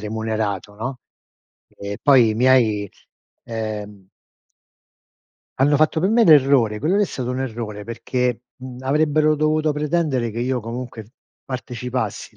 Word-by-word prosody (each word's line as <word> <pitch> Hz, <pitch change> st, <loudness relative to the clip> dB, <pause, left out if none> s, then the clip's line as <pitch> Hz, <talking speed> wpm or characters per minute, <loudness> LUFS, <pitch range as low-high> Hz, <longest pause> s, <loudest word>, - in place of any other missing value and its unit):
remunerato, 110 Hz, -2 st, -3 dB
no. 125 Hz, +4 st, -5 dB, 0.7 s
E 100 Hz, 0 st, -7 dB
poi 125 Hz, -6 st, +5 dB
i -, -, -2 dB
miei, 115 Hz, -5 st, +3 dB, 0.5 s
ehm 105 Hz, -4 st, -6 dB, 1.5 s
hanno 145 Hz, +2 st, +4 dB
fatto 155 Hz, +2 st, +2 dB
per 185 Hz, -, +1 dB
me 230 Hz, +2 st, +4 dB
l'errore 135 Hz, -, +5 dB
quello 160 Hz, -, 0 dB
lì 210 Hz, -, +3 dB
è -, -, +3 dB
stato 125 Hz, -8 st, -4 dB
un 130 Hz, +1 st, -3 dB
errore, 110 Hz, -4 st, -5 dB
perché, 120 Hz, +1 st, -2 dB, 0.2 s
mhmm, 130 Hz, -1 st, -9 dB
avrebbero 155 Hz, +2 st, +2 dB
dovuto 155 Hz, 0 st, +1 dB
pretendere 150 Hz, -5 st, -1 dB
che 115 Hz, -, -6 dB
io 125 Hz, 0 st, -1 dB
comunque 115 Hz, -1 st, -7 dB, 0.3 s
partecipassi, 125 Hz, -3 st, -5 dB
125 Hz, 130 wpm, -21 LUFS, 110-145 Hz, 1.5 s, poi